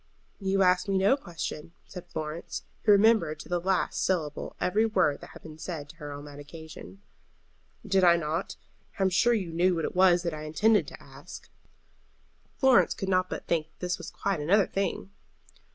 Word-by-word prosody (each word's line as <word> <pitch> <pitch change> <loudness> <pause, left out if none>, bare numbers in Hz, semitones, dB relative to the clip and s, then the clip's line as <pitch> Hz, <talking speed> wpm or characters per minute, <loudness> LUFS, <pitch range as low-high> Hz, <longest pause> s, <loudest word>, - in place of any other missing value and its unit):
"You 195 -1 +1
asked 180 +2 +2
me 195 - +2
no 195 +7 +4
question," 170 - -7
said 180 -2 -10
Florence, 155 +1 -5 0.2
who 215 - +6
remembered 200 -7 +4
to - - -13
the 175 0 0
last 185 +1 0
syllable 160 -6 -2
every 205 +5 +2
word 190 -10 +1
that - - -11
had - - -13
been 155 -1 -11
said 155 -3 -6
to 165 - -14
her 150 -2 -7
on 145 0 -8
that 145 0 -11
occasion. 160 +6 -11 0.8
"Did 195 -2 +2
I 170 -1 +7
not? 165 +2 -3 0.4
I 195 - 0
am 190 - +3
sure 240 +6 +3
you 185 -6 -3
knew 180 +2 +2
what 165 -2 -1
it - - -5
was 180 -1 +5
that 170 -2 -2
I 155 - -6
intended 210 +8 +2
to - - -11
ask." - - -12 1.1
Florence 265 -3 +4
could 195 - -4
not 185 -1 +2
but - - -6
think 160 -2 0
that - - -38
this 180 -1 -2
was - - -7
quite 195 -4 -2
another 185 +7 +3
thing. 195 0 -3
180 Hz, 195 wpm, -28 LUFS, 160-195 Hz, 1.1 s, I